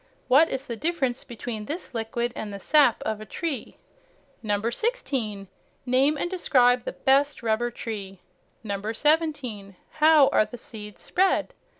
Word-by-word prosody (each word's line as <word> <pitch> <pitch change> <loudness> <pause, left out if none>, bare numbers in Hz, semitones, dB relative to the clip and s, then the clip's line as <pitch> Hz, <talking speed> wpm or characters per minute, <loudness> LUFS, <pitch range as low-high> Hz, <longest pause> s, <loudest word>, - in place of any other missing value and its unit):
What 275 +6 +6
is 265 +1 -3
the 235 - -4
difference 270 -3 -1
between 230 -3 -6
this 315 - -6
liquid 235 +1 -2
and 215 -1 -5
the 200 - -7
sap 285 +1 +3
of 215 -1 -3
a - - -5
tree. 290 - -4 0.7
16. 220 - -2 0.4
Name 270 +4 +3
and 315 - -1
describe 250 -9 +3
the - - -4
best 275 0 +2
rubber 230 +2 +1
tree. 200 -5 -7 0.5
17. 225 - -1 0.2
How 305 -2 +7
are 215 - +3
the 245 - -10
seeds 210 -5 -10
spread? 380 +1 +1
245 Hz, 135 wpm, -25 LUFS, 215-295 Hz, 0.7 s, How